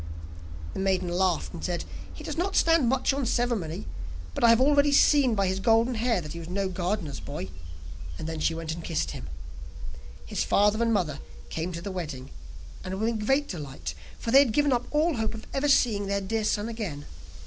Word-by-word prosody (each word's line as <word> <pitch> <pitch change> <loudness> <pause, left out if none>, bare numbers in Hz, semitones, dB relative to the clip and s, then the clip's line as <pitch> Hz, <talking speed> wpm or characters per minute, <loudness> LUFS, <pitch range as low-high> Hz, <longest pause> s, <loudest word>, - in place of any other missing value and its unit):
The - - -5
maiden 190 -2 +1
laughed, 180 0 0
and - - -8
said: 175 -2 -2 0.3
'He - - -10
does - - -4
not 370 +4 -1
stand 330 -7 +4
much 265 +1 +2
on 275 0 -1
ceremony, 225 - -1 0.5
but - - -3
I 235 - +8
have 230 0 +6
already 285 +2 +4
seen 280 -4 +5
by 200 -1 +2
his 190 +1 0
golden 230 +4 +3
hair 230 -3 +1
that 150 -2 -7
he 170 - -6
was 165 0 -8
no 195 +1 -1
gardener's 180 -4 -2
boy,' 75 -1 -6 0.7
and - - -5
then 160 -1 -4
she 160 - +1
went 165 -1 -4
and 165 0 -7
kissed 165 -1 -1
him. 65 - -7 1.0
His - - -1
father 210 +2 +3
and 230 0 +2
mother 160 -9 0 0.3
came 165 +3 -3
to 170 0 -6
the 200 - -4
wedding, 150 -8 -5 0.5
and 190 0 -4
were 220 - +1
in 230 -1 -1
great 270 +7 +2
delight, 145 -7 -6 0.2
for 230 - -3
they 270 - +9
had 265 -6 +4
given 290 +1 +3
up 240 - -1
all 305 0 +2
hope 220 0 -1
of 220 - -9
ever 275 +2 +1
seeing 215 -7 +3
their 200 0 0
dear 215 +3 -2
son 210 0 0
again. 205 -11 -5
205 Hz, 210 wpm, -27 LUFS, 175-245 Hz, 1.0 s, they